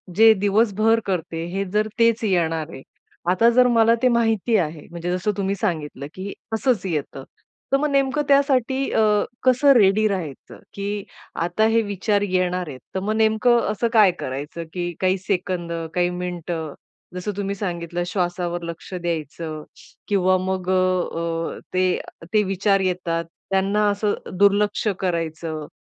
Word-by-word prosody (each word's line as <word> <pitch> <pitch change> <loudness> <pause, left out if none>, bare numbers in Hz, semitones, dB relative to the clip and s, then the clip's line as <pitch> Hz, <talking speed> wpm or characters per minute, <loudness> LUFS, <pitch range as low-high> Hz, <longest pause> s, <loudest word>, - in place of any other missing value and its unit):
जे 225 +2 +8
दिवसभर 215 +2 +3
करते 165 -3 -2
हे 195 +1 0
जर 210 +1 +2
तेच 230 0 +3
येणार 165 -6 0
आहे. 135 - -9 0.5
आता 230 +6 +4
जर 250 0 +6
मला 230 -1 +4
ते - - +6
माहिती 230 -2 +2
आहे, 155 -4 -2
म्हणजे 170 +1 -4
जसं 185 +4 0
तुम्ही 195 0 0
सांगितलं 155 -8 -3
की 195 +2 -6 0.2
"असंच 220 -3 +1
येतं." 150 -6 -3 0.5
तर 275 - +5
मग 300 +2 0
नेमकं 275 +1 +2
त्यासाठी 275 -1 +2
अ, - - +2 0.4
कसं 260 +2 +5
रेडी 215 -1 +4
राहायचं 175 -9 -5
की 200 0 -3 0.4
आता 175 +6 +1
हे 230 - +4
विचार 205 0 0
येणार 185 -2 0
आहेत. 135 -4 -8 0.2
तर - - +1
मग 205 +3 -1
नेमकं 220 +2 +3
असं 225 +2 0
काय 210 -4 +6
करायचं 145 +6 -5
की 175 -1 -2
काही 185 0 +2
सेकंद, 185 -2 -2 0.2
काही 175 0 +2
मिनिटं 175 -3 -4 0.4
जसं 180 +3 -3
तुम्ही 200 0 -2
सांगितलं 175 -3 -3
"श्वासावर 175 -1 -2
लक्ष 170 +2 -7
द्यायचं 165 -2 -4 0.4
किंवा 185 -2 +3
मग 185 0 -3
अ, 175 -3 0
ते 185 0 +2 0.3
ते 215 -1 +4
विचार 195 +1 +1
येतात, 175 -3 -1 0.3
त्यांना 200 +2 +2
असं 205 +1 0 0.2
दुर्लक्ष 205 +2 +3
करायचं." 165 -3 -3
190 Hz, 145 wpm, -22 LUFS, 175-215 Hz, 0.5 s, जे